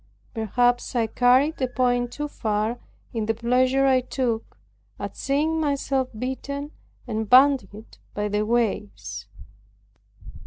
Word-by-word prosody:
Perhaps 245 +2 +1
I 235 -2 +2
carried 255 +7 +3
the 260 - 0
point 245 -1 0
too 295 +3 -4
far 220 -2 -2 0.3
in 220 -2 -2
the 225 - +1
pleasure 255 +3 +2
I 260 -1 +4
took, 245 -3 -3 0.4
at - - -6
seeing 305 +4 0
myself 275 -3 0
beaten 280 +4 -4 0.3
and 220 -3 -3
bandied 250 -5 +3 0.2
by 210 0 -1
the 210 +1 0
waters. 105 - -2
245 Hz, 120 wpm, -24 LUFS, 220-265 Hz, 0.4 s, I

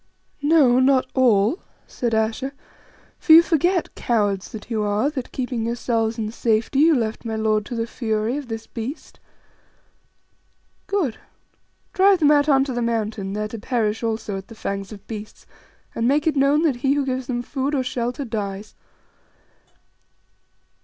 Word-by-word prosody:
"No, 290 -5 +4
not 260 0 +4
all," 245 - +3 0.3
said 235 -2 -2
Ayesha; 225 +5 -1 0.7
"for 320 - +5
you 330 +1 +10
forget, 345 +2 +1
cowards 205 -5 -1
that 215 -2 -9
you 220 -2 -1
are, 210 +7 0
that, 260 -5 -6
keeping 245 -3 -3
yourselves 230 -1 -1
in 215 -1 -3
safety, 230 +3 0
you 320 +1 +5
left 225 -3 -2
my 225 -2 -3
lord 215 -1 0
to 245 - -5
the 230 0 -1
fury 220 0 -2
of 290 -3 -5
this 225 -1 -6
beast. 240 +7 -7 1.7
Good. 360 - -1 0.7
Drive 390 +1 +5
them 300 -3 +4
out 295 0 +3
on 270 -2 +5
to 270 -2 -4
the 240 - -2
Mountain, 215 -4 -2
there 210 +1 -2
to 230 - -7
perish 225 -2 -1
also 220 -3 -2
at 190 - -13
the 225 - -12
fangs 195 -1 -4
of 205 -2 -11
beasts, 215 -1 -9 0.5
and 230 - 0
make 290 +4 +2
it 315 -2 +1
known 280 +3 +3
that 290 -7 +1
he 270 +3 +1
who 285 -1 0
gives 260 -1 -3
them 245 -1 -2
food 280 +2 -2
or 265 - +1
shelter 250 +2 -3
dies." 205 -3 -5
240 Hz, 165 wpm, -22 LUFS, 220-275 Hz, 1.7 s, you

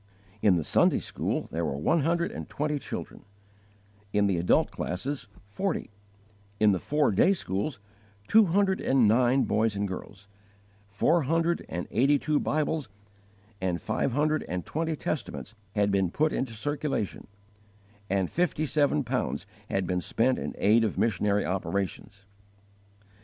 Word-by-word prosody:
In 100 -4 +5
the 85 - 0
Sunday - - +3
school - - -3
there - - -2
were 70 - -2
one 160 - +2
hundred 170 +3 +1
and - - -7
twenty 150 0 -1
children; - - -7 0.9
in 105 0 +2
the 95 -4 +1
adult 85 - +3
classes, 125 +8 -4 0.2
forty; 185 - -3 0.7
in 105 -1 +5
the 95 - +1
four 150 - +1
day 105 - +4
schools, 110 - -3 0.5
two 220 0 +6
hundred 190 +2 +2
and 130 -4 +3
nine 125 +4 +4
boys 110 0 +1
and 100 0 -1
girls; 95 +1 -8 0.6
four 130 +12 +2
hundred 165 +4 +1
and 85 +2 -4
eighty 135 +6 +4
two 150 +2 0
Bibles 155 -1 -1 0.7
and 90 -2 0
five 125 - -1
hundred 155 +3 +1
and 90 -1 -3
twenty 160 +1 -2
Testaments 150 -6 -4 0.2
had 100 -1 +2
been 95 -2 +2
put 155 - +1
into 130 -3 -2
circulation, 145 -2 -3 0.8
and 95 -1 +1
fifty 155 - 0
seven 145 0 +2
pounds 125 +1 -2 0.2
had 95 -1 0
been 90 0 -1
spent 125 +8 +1
in - - -5
aid 110 +3 +4
of 110 - -1
missionary 105 -2 +1
operations. 100 +1 -3
120 Hz, 145 wpm, -28 LUFS, 100-150 Hz, 0.9 s, two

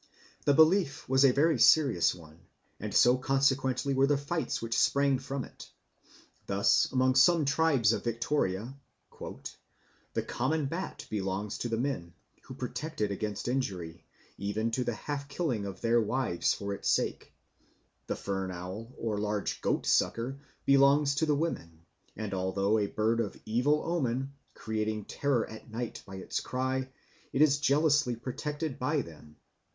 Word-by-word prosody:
The 145 - +4
belief 160 -1 +3
was 130 +1 +4
a 135 - +7
very 150 +1 +2
serious 135 - +5
one, 80 -2 -15 0.4
and - - -5
so 125 +1 +5
consequently 135 0 +1
were 135 +1 +3
the 145 0 +3
fights 145 0 -2
which 115 0 -3
sprang 140 -2 +3
from 135 0 -4
it. - - -13 0.8
Thus - - +3
among 130 0 +3
some 155 +4 +5
tribes 140 -6 +3
of - - -3
Victoria 115 -2 -1 0.5
"the - - -9
common 145 +5 -1
bat 170 +7 -5
belongs 100 0 -3
to 120 - -3
the 115 - -1
men, 110 -10 -3 0.3
who 130 - -9
protect 150 +5 -5
it 105 -1 +1
against 105 +1 -4
injury, 95 -10 -3 0.4
even 110 +3 -1
to 125 +2 0
the 120 -2 -2
half 140 +3 -5
killing 135 - -2
of 95 -2 -8
their 115 0 +3
wives 110 -5 0
for 100 0 -4
its - - -3
sake. - - 0 0.8
The - - -1
fern 95 -1 -3
owl, 95 +6 -7
or 110 -3 -2
large 105 -1 -2
goatsucker, 130 +4 0 0.3
belongs 140 +1 +5
to 155 +3 0
the 150 - +3
women, 85 - -4 0.3
and, 110 -2 -5
although 95 +3 +1
a 100 - 0
bird 110 +3 0
of 110 -4 -3
evil 125 +7 +1
omen, 135 -5 -1 0.2
creating 110 -1 -3
terror 140 -5 0
at 110 +1 -11
night 115 +1 -5
by 95 - -8
its 95 - -3
cry, 130 +1 -2 0.4
it 140 - +4
is 145 -2 +3
jealously 145 -3 +3
protected 145 +5 -4
by 145 +2 0
them. 75 -3 -14
125 Hz, 155 wpm, -30 LUFS, 105-140 Hz, 0.8 s, a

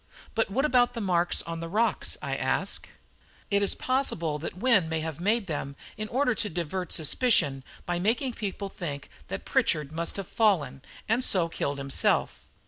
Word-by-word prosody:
"But 225 - +1
what 265 +8 +1
about 245 -4 +3
the - - -2
marks 180 -4 +1
on 165 0 -5
the 165 0 -5
rocks?" 220 +6 0
I - - -1
asked. - - -1 0.6
"It 200 0 +3
is 200 - +3
possible 170 - 0
that 165 +3 -6
Wynne 200 -6 +3
may 160 0 -1
have 160 -2 -4
made 210 +4 +1
them 145 -4 -4 0.2
in 215 - -4
order 250 +2 +2
to 215 -1 -2
divert 175 +1 -3
suspicion 150 - +3 0.2
by 175 0 -1
making 235 +7 +1
people 200 -2 -4
think 150 -8 -6 0.2
that - - -5
Pritchard 150 -2 +1
must 165 +4 -1
have 195 -2 -4
fallen, 165 - +2 0.3
and 225 +4 +2
so 180 -8 +3
killed 140 -3 -2
himself. 140 -1 0
185 Hz, 175 wpm, -28 LUFS, 160-225 Hz, 0.6 s, about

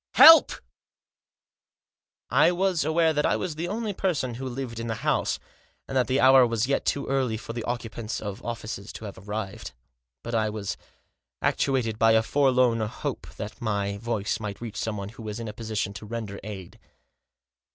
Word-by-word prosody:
" - - -67
Help! 325 0 +10 1.0
" - - -68 0.2
I - - +4
was 180 -2 +1
aware 160 +1 +3
that 150 0 +1
I - - +2
was 180 -4 -3
the 165 +3 -4
only 215 +2 -2
person 155 -11 -1
who 130 +3 -5
lived 120 -2 -5
in 115 - -4
the 110 -2 -4
house, - - +1 0.5
and 135 - -5
that 125 -3 +3
the 130 +2 +1
hour 130 -1 +7
was 115 0 0
yet 140 +2 0
too 140 - 0
early 130 -5 0
for 115 +1 -7
the 120 -1 -4
occupants 115 -2 -4
of 100 -2 -6
offices 110 -3 -5
to 110 - -8
have 100 -2 -8
arrived. 105 -5 -5 0.5
But 120 - -5
I 110 -1 +2
tras 105 -2 -4 0.7
actuated 115 -5 +1
by 115 0 +5
a 110 0 +4
forlorn 125 -2 +3
hope 110 0 -4
that 105 +5 -7
my 100 -3 -1
voice 110 -2 -2
might 105 -3 -5
reach 115 -3 -7
someone 105 -3 -3
who 115 +2 -12
was 110 0 -5
in 115 - -5
a 105 - -5
position 110 -3 -3
to 105 +1 -9
render 110 -3 -5
aid. 95 -4 -8
115 Hz, 185 wpm, -26 LUFS, 105-135 Hz, 1.0 s, Help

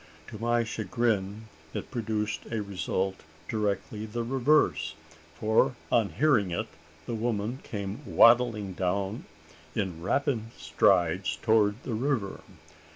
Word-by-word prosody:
To 105 - -8
my 120 +1 +2
chagrin, 110 -3 -1 0.3
it - - -5
produced 110 -3 -2
a 115 -2 -2
result 95 -1 -2 0.3
directly 105 0 -2
the 120 +2 -3
reverse; 135 +5 +2 0.4
for, 110 +4 +2 0.2
on 115 -4 +3
hearing 130 -10 +3
it, 85 - -2 0.4
the 120 - -4
woman 115 +1 -1
came 100 +1 -5
waddling 115 -4 +5
down 95 +4 -2 0.5
in 90 -5 -2
rapid 115 - 0
strides 90 +2 +2
towards 110 +1 +3
the 120 - -4
river. 115 -4 -1
110 Hz, 115 wpm, -28 LUFS, 100-120 Hz, 0.5 s, waddling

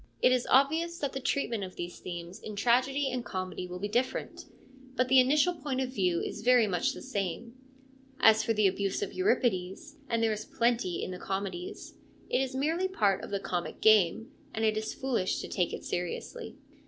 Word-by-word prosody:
It - - +5
is 250 -1 +1
obvious 320 +6 +3
that 285 -4 -3
the 270 - -3
treatment 240 -5 -1
of 185 -1 -7
these 175 0 -6
themes 175 0 -7
in 215 - -7
tragedy 260 +6 +2
and 250 -1 -3
comedy 185 -2 -4
will 180 0 -6
be 200 +3 -3
different; 245 +5 -2 0.5
but 255 -1 +1
the 265 0 +7
initial 295 +7 +4
point 280 -5 -3
of 260 -1 -2
view 180 -7 +1
is - - -5
very 245 0 +5
much 215 +8 0
the - - -9
same. 220 -1 -3 0.7
As 220 0 +6
for 225 - 0
the 215 -2 +2
abuse 195 - 0
of 400 - -5
Euripides, 250 - 0
and 230 -1 +1
there 220 -1 +2
is 215 0 -5
plenty 235 -7 0
in - - -4
the 180 - -6
comedies, 190 -2 -5 0.4
it - - +3
is 265 -1 -3
merely 325 +7 +1
part 205 - +1
of - - -6
the 200 - -1
comic 175 -2 -4
game, 220 - +4 0.2
and 220 0 0
it 215 -1 +2
is 220 0 -2
foolish 240 -8 -1
to - - -5
take 180 -2 0
it - - -6
seriously. 180 - -4
225 Hz, 200 wpm, -30 LUFS, 190-265 Hz, 0.7 s, the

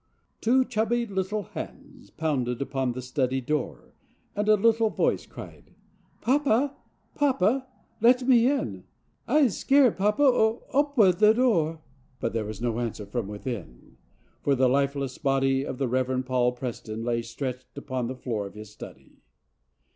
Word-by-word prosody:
17 255 +3 +4
] - - -13
Two - - -20
chubby 235 +1 0
little 200 0 -2
hands - - -10
pounded 130 -7 -2
upon 135 -2 -1
the 125 +1 -6
study 130 0 -1
door 140 +1 -4 0.4
and 210 +1 0
a 215 - +7
little 225 +1 +3
voice - - 0
cried: - - -12 0.2
" - - -37
Papa, 275 +1 +2 0.4
papa, 260 -2 +1 0.3
let 245 +2 +5
me 245 -1 +5
in! 280 -1 -2 0.4
I'se 285 -8 +3
scared, 270 -4 +4
papa! 210 +8 +2 0.5
Opa 220 -8 +4
door! 165 -11 +1 0.2
" 130 0 -36
But 115 - -2
there 115 -2 -1
was 105 -1 -6
no 120 -1 -1
answer 115 -3 -4
from 105 +1 -3
within, 105 - -7 0.4
for 140 - +2
the 130 0 +3
life¬ 140 +2 +1
less 135 -2 -4
body 135 -1 +1
of 135 - -5
the 135 - 0
Reverend 130 +1 0
Paul 125 -1 +1
Preston 115 -3 -6
lay 115 0 0
stretched 125 +3 -6
upon 130 -3 -3
the 130 - -5
floor 110 -6 -3
of 100 - -14
his 105 -1 -10
study. 105 - -13
140 Hz, 160 wpm, -26 LUFS, -, 0.5 s, a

